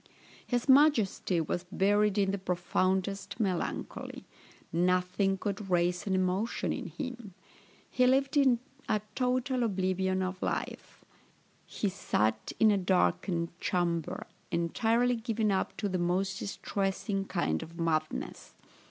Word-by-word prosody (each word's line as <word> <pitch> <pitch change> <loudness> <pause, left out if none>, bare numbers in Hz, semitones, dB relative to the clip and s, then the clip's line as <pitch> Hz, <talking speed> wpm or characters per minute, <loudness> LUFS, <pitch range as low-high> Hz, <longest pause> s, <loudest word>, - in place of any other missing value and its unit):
His 245 0 -1
majesty 260 - +4
was 175 +2 -2
buried 205 +1 +2
in 195 -1 +2
the 200 - -2
profoundest 185 +2 -1
melancholy; 190 -5 -3 0.5
nothing 180 +3 +2
could 200 0 -4
raise 180 +1 +1
an 190 - +1
emotion 185 +4 0
in - - -5
him; 240 -8 -7 0.5
he 250 0 +2
lived 270 +3 +2
in 265 -4 +5 0.3
a 215 - +2
total 255 0 0
oblivion 190 -3 0
of 185 0 -4
life; - - -4 0.6
he 210 - -2
sate 110 - 0
in 220 -1 +6
a 200 - +2
darkened 180 -2 +1
chamber, 170 -3 -1 0.2
entirely 225 +9 +1
given 225 -2 0
up 190 - -1
to 205 - -1
the 185 -2 -1
most 185 +2 0
distressing 195 0 -2
kind 80 - -1
of 170 +2 -10
madness. 155 -2 -2
195 Hz, 125 wpm, -30 LUFS, 180-220 Hz, 0.6 s, in